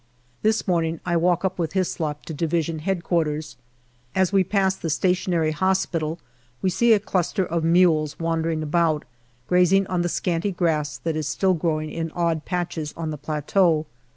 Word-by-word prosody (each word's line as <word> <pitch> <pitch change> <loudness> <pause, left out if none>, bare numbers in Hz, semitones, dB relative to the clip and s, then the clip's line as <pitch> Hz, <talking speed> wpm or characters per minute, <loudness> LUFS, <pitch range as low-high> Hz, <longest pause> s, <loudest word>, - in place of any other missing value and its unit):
This 215 0 +1
morning 165 -3 0
I 175 -1 0
walk 175 +2 +2
up 185 -1 -2
with 165 -1 -1
Hyslop 160 -5 -2
to 160 - -6
D.H.Q. 165 0 -1 0.7
As 190 0 +2
we 195 -1 +5
pass 190 0 +1
the 165 - -4
Stationary 175 -1 +1
Hospital 165 -2 0 0.4
we 185 - 0
see 235 +5 +4
a 210 - +4
cluster 190 -1 0
of 165 -1 -2
mules 165 -3 +3
wandering 165 -1 -1
about, 155 0 +1 0.4
grazing 180 +3 +4
on 180 -2 -1
the 175 - 0
scanty 175 +3 -1
grass 160 -5 0
that 165 -2 -3
is 155 -2 -2
still 190 +4 +2
growing 155 -2 -1
in 165 0 -3
odd 165 -3 0
patches 175 -4 -3
on 160 -2 -3
the - - -3
plateau. 155 +2 +1
170 Hz, 160 wpm, -23 LUFS, 155-185 Hz, 0.7 s, we